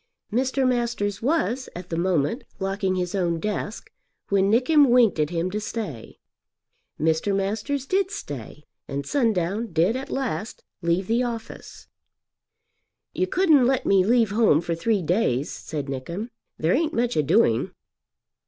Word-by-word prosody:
Mr. 260 +2 +1
Masters 235 -5 -1
was, 265 -2 0
at 180 +1 -8
the 165 - -2
moment, 170 - 0
locking 195 0 -1
his 180 -1 -2
own 175 -4 0
desk, 210 +2 -4 0.4
when 195 0 +3
Nickem 265 +5 +4
winked 235 -8 +4
at 150 -1 +1
him 175 +1 -2
to 210 - -2
stay. 210 - -6 0.8
Mr. 160 +6 +1
Masters 220 +8 -2
did 380 +5 +1
stay, 145 - -8 0.2
and 140 0 -4
Sundown 220 - 0
did 170 +7 +2
at 265 +1 -5
last 235 -7 -3 0.2
leave 170 +3 +1
the 230 +5 +1
office. 235 -2 -6 1.3
"You 370 - 0
couldn't 315 -10 +4
let 265 -1 +1
me 195 -2 +4
leave 225 0 +3
home 210 -8 +4
for 170 0 -2
three 195 +3 0
days?" 155 - 0
said 150 -3 -5
Nickem. 170 - -5 0.3
"There 160 +3 +1
ain't 315 +2 0
much 240 +1 0
a - - +3
doing." 115 -5 +2
205 Hz, 145 wpm, -24 LUFS, 170-245 Hz, 1.3 s, Nickem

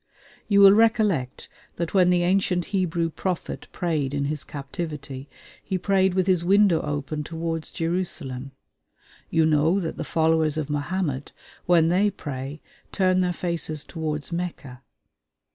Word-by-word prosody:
You 200 -2 +4
will 195 0 +9
recollect 210 - +2 0.3
that 170 -1 -3
when 185 -2 +5
the 175 -1 +3
ancient 180 -1 +1
Hebrew 170 -3 0
prophet 180 +1 -4
prayed 150 -6 -1
in 140 0 0
his 150 0 -2
captivity, 140 -1 -6 0.3
he 190 - -2
prayed 190 0 +2
with 185 -1 +2
his 185 -3 +2
window 195 -2 +4
open 150 +1 -3
towards 165 0 -4
Jerusalem. 165 -6 -3 0.8
You 165 -1 +3
know 160 +4 +3
that 165 -4 -4
the - - -3
followers 160 -1 +1
of 150 -2 -2
Mohammed, 145 -2 -2 0.3
when 165 -2 +5
they 195 +4 +3
pray, 145 -5 -7 0.3
turn 185 -1 +2
their 180 -1 +2
faces 170 -4 -3
towards 155 -1 -4
Mecca. 165 -7 -5
165 Hz, 140 wpm, -24 LUFS, 150-185 Hz, 0.8 s, will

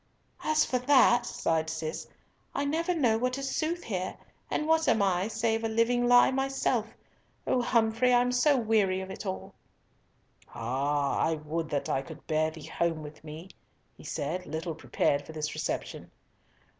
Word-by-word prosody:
"As 310 0 +3
for 250 - 0
that," 250 -2 +5
sighed 160 -1 0
Cis, 160 0 -4 0.5
"I 280 - 0
never 335 +5 0
know 235 -8 +2
what 250 +2 0
is 275 -1 -3
sooth 335 +2 -1
here, 185 -4 -3 0.3
and 305 - -1
what 320 0 +3
am 220 - +3
I 190 0 +1
save 225 0 0
a - - +1
living 240 +2 +2
lie 245 +1 +6
myself? 270 -4 0 0.6
O 250 - +2
Humfrey! 230 +1 +2
I 245 - +6
am 250 0 +1
so 270 +3 +3
weary 210 -5 +2
of 190 0 -7
it 195 - -7
all." 190 - -5 1.0
"Ah 140 +4 0
I 160 - +2
would 155 +1 -4
that 145 -2 -2
I 135 - 0
could 135 - -11
bear 155 0 +1
thee 160 -1 -10
home 165 -2 -1
with 150 +1 -11
me," 160 +4 -9 0.5
he - - -15
said, 165 +5 -3
little 160 +2 -3
prepared 145 -2 0
for 160 - -11
this 150 -1 -3
reception. - - -4
220 Hz, 170 wpm, -29 LUFS, 160-250 Hz, 1.0 s, lie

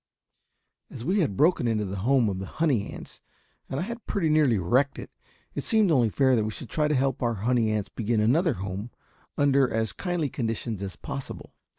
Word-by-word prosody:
As 115 - -8
we 190 +6 +2
had 110 - 0
broken 155 -6 +3
into 110 -2 0
the 100 +1 -5
home 125 +4 +3
of 95 -2 -2
the 95 - -5
honey 135 - 0
ants - - -10 0.5
and 135 - -2
had 230 +6 -5
pretty 175 -6 0
nearly 150 -7 +4
wrecked 125 +10 +1
it, - - -8 0.4
it - - -3
seemed 220 -6 +3
only 125 -7 +4
fair 130 +3 +3
that 110 - +2
we 110 - -2
should 110 - -8
try 150 -1 +1
to 150 - +1
help 135 0 0
our 120 -2 0
honey 115 +2 +1
ants 105 -2 -1
begin 115 0 -1
another 145 - +3
home 100 +2 -5 0.5
under 140 -2 +3
as 110 -2 -1
kindly 175 -5 -2
conditions 115 -4 -3
as 95 -2 -5
possible. 135 - -7
125 Hz, 200 wpm, -26 LUFS, 110-150 Hz, 0.5 s, nearly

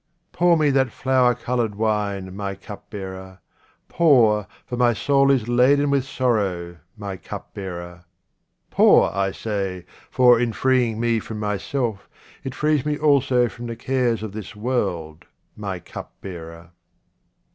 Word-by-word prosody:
Pour 175 -1 +3
me 150 -2 +3
that 135 -1 +2
flower 125 -1 +2
coloured 120 -3 -2
wine, 100 -3 -1
my 100 -1 -4
cup 100 +1 -11
bearer; 95 -2 -8 0.5
pour, 115 - +4 0.2
for 125 - -5
my 120 -1 +3
soul 140 +4 +2
is 130 -5 +2
laden 140 +4 +3
with 140 -2 +1
sorrow, 100 -10 -1 0.2
my 100 -2 -5
cupbearer; 90 -2 -8 0.7
pour, - - +5
I 100 0 0
say, 95 -4 -4 0.2
for, 125 -2 +5
in 120 -2 0
freeing 125 -4 +1
me 115 -1 +1
from 110 0 -7
myself, 105 +2 -3 0.3
it 130 -1 -5
frees 150 -3 +1
me 150 0 -1
also 135 -5 +3
from 120 +3 -8
the 115 - -5
cares 120 -2 0
of 110 - -5
this 105 0 -8
world, 95 -8 -2 0.3
my 100 -3 -4
cupbearer. 85 -1 -10
110 Hz, 135 wpm, -22 LUFS, 95-130 Hz, 0.7 s, pour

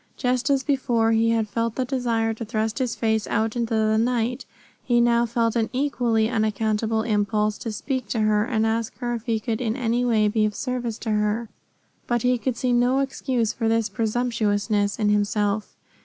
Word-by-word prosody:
Just 250 +1 0
as 275 -1 +2
before 240 -5 +1
he 225 0 +3
had 225 -1 +1
felt 230 +2 -2
the 260 - -1
desire 235 -4 0
to 225 - -6
thrust 220 +1 -2
his 250 -3 -1
face 220 -2 0
out 220 +1 0
into 235 -1 -1
the 220 0 +2
night, 245 +2 -1 0.4
he 240 -1 +2
felt 235 -1 +2
now 230 -1 +2
an 220 - -2
equally 245 -5 +1
unaccountable 220 -1 0
impulse 210 -1 0
to 230 - -4
speak 255 +2 -3
to 220 +2 -1
her 210 -1 +3
and 225 -2 0
ask 225 -1 -1
her 240 0 -2
if 235 +1 -6
he 225 -2 +1
could 225 +2 -3
in 225 -2 -1
any 240 -1 0
way 220 -3 +3
be 215 +1 +1
of 210 -1 0
service 245 -4 -3
to 225 - -4
her. 210 +2 0 0.6
But 240 -2 0
he 250 -1 +2
could 250 0 -2
see 250 -1 0
no 245 +2 +3
excuse 260 -4 -1
for 225 - -2
this 225 -1 +1
presumptuousness 215 -3 0
in 210 -2 +1
himself. 210 0 0
225 Hz, 195 wpm, -24 LUFS, 215-245 Hz, 0.6 s, he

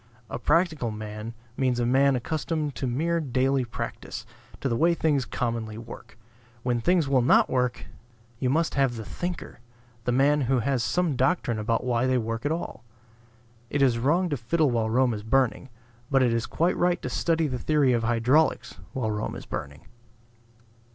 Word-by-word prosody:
A - - -3
practical 155 -3 +1
man 105 +1 -6 0.2
means 130 -2 +1
a 120 - +1
man 135 +2 +4
accustomed 155 +3 -2
to 130 - -3
mere 165 +8 0
daily 135 -2 +1
practice, 120 - -6 0.3
to - - -1
the 120 - 0
way 170 +7 +3
things 145 -6 +1
commonly 115 -3 -3
work. 115 0 -11 0.5
When 120 -2 0
things 175 +1 +2
will 135 -2 +3
not 120 - +4
work, 125 -1 0 0.5
you 130 - 0
must 160 +5 +1
have 135 -3 +1
the 110 -2 -6
thinker, 175 - -5 0.5
the 125 - +1
man 140 +4 +3
who 130 0 +1
has 125 +1 0
some 175 +1 0
doctrine 130 -4 +1
about 115 +2 0
why 125 0 +1
they 130 0 +2
work 115 +3 -2
at - - -1
all. 160 -7 -4 0.9
It 140 -1 +1
is 120 -3 +3
wrong 165 +9 +2
to 145 - -1
fiddle 145 +4 +1
while 115 -2 0
Rome 125 +1 +2
is 105 - -5
burning; 130 +3 +1 0.4
but 135 -2 +4
it 120 -2 +2
is 115 0 -1
quite 170 +3 +1
right 175 0 +2
to - - -2
study 165 -1 +1
the 130 -4 -2
theory 145 -3 +2
of 120 - +1
hydraulics 120 - +2
while 115 -5 -1
Rome 105 0 -3
is - - -8
burning. 70 +1 -6
130 Hz, 180 wpm, -26 LUFS, 115-150 Hz, 0.9 s, man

